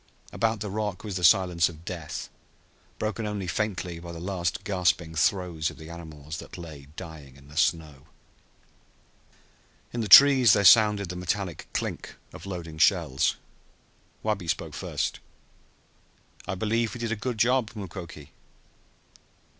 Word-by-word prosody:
About 110 Hz, -2 st, 0 dB
the 105 Hz, -, -4 dB
rock 105 Hz, -3 st, -3 dB
was 105 Hz, -4 st, -5 dB
the 90 Hz, -, -5 dB
silence 90 Hz, 0 st, +4 dB
of 80 Hz, 0 st, -13 dB
death, 85 Hz, -4 st, -6 dB, 0.7 s
broken 110 Hz, 0 st, -3 dB
only 105 Hz, -2 st, -3 dB
faintly 90 Hz, -3 st, -3 dB
by 85 Hz, 0 st, -9 dB
the 85 Hz, -, -8 dB
last 90 Hz, -1 st, -2 dB
gasping 90 Hz, -4 st, 0 dB
throes 80 Hz, 0 st, 0 dB
of -, -, -12 dB
the 80 Hz, +1 st, -10 dB
animals 80 Hz, -2 st, -8 dB
that -, -, -10 dB
lay 75 Hz, -5 st, -10 dB
dying 80 Hz, -7 st, -10 dB
in 70 Hz, +1 st, -17 dB
the 75 Hz, -, -14 dB
snow. 75 Hz, -3 st, 0 dB, 1.9 s
In 120 Hz, -, -2 dB
the 110 Hz, -, -2 dB
trees 130 Hz, 0 st, +9 dB
there 100 Hz, -, +2 dB
sounded 105 Hz, -2 st, +6 dB
the 90 Hz, -, -5 dB
metallic 90 Hz, -1 st, -3 dB
clink -, -, -4 dB, 0.2 s
of -, -, -10 dB
loading 85 Hz, -4 st, -7 dB
shells. 65 Hz, -3 st, +3 dB, 0.9 s
Wabi 105 Hz, -5 st, -1 dB
spoke -, -, -2 dB
first. -, -, -3 dB, 1.3 s
"I -, -, -2 dB
believe 110 Hz, +4 st, -1 dB
we -, -, -7 dB
did 115 Hz, -1 st, -3 dB
a -, -, +1 dB
good 120 Hz, +2 st, -4 dB
job, 120 Hz, +1 st, +2 dB
Mukoki!" 85 Hz, -7 st, -8 dB
90 Hz, 145 wpm, -27 LUFS, 80-105 Hz, 1.9 s, trees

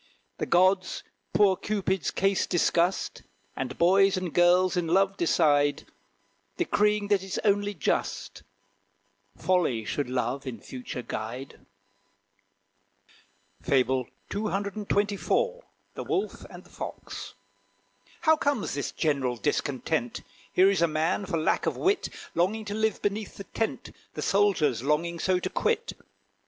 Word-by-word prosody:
The -, -, -2 dB
gods 185 Hz, +2 st, +3 dB, 0.3 s
poor 200 Hz, -2 st, +4 dB
Cupid's 195 Hz, -3 st, -1 dB
case 195 Hz, -1 st, +1 dB
discussed, 175 Hz, +1 st, +1 dB, 0.3 s
And -, -, -4 dB
boys 195 Hz, +2 st, +4 dB
and 185 Hz, -3 st, -3 dB
girls 180 Hz, +1 st, +4 dB
in 175 Hz, -2 st, 0 dB
love 195 Hz, +3 st, +3 dB
decide, 145 Hz, -5 st, +2 dB, 0.7 s
Decreeing 210 Hz, -, +1 dB
that 200 Hz, -2 st, +3 dB
it's 190 Hz, 0 st, -4 dB
only 205 Hz, 0 st, +2 dB
just, 155 Hz, -, -2 dB, 1.0 s
Folly 165 Hz, -12 st, +1 dB
should 145 Hz, +2 st, -2 dB
Love 125 Hz, +2 st, -2 dB
in 120 Hz, -4 st, -5 dB
future 125 Hz, +2 st, -7 dB
guide. 120 Hz, +6 st, -6 dB, 2.0 s
FABLE 130 Hz, -1 st, +2 dB, 0.2 s
CCXXIV. 205 Hz, -, 0 dB, 0.3 s
THE -, -, -5 dB
WOLF 405 Hz, 0 st, -2 dB
AND -, -, -11 dB
THE -, -, -20 dB
FOX. -, -, -7 dB, 0.9 s
How 315 Hz, -1 st, +5 dB
comes 285 Hz, -7 st, -1 dB
this 140 Hz, 0 st, -3 dB
general 135 Hz, -6 st, 0 dB
discontent? 140 Hz, -1 st, -1 dB, 0.3 s
Here 190 Hz, +2 st, +5 dB
is 190 Hz, -4 st, 0 dB
a 170 Hz, -, +5 dB
man, 160 Hz, +5 st, 0 dB
for 170 Hz, -, -1 dB
lack 160 Hz, -, +1 dB
of -, -, -1 dB
wit, 400 Hz, +2 st, +1 dB, 0.2 s
Longing 210 Hz, +6 st, 0 dB
to 205 Hz, -, -4 dB
live 220 Hz, +1 st, 0 dB
beneath 205 Hz, +1 st, -2 dB
the 200 Hz, -, -6 dB
tent 225 Hz, +2 st, -3 dB, 0.2 s
The -, -, -3 dB
soldier's 195 Hz, -, +2 dB
longing 165 Hz, +5 st, 0 dB
so 185 Hz, +2 st, +2 dB
to 180 Hz, -, -3 dB
quit. -, -, 0 dB
185 Hz, 125 wpm, -27 LUFS, 150-205 Hz, 2.0 s, How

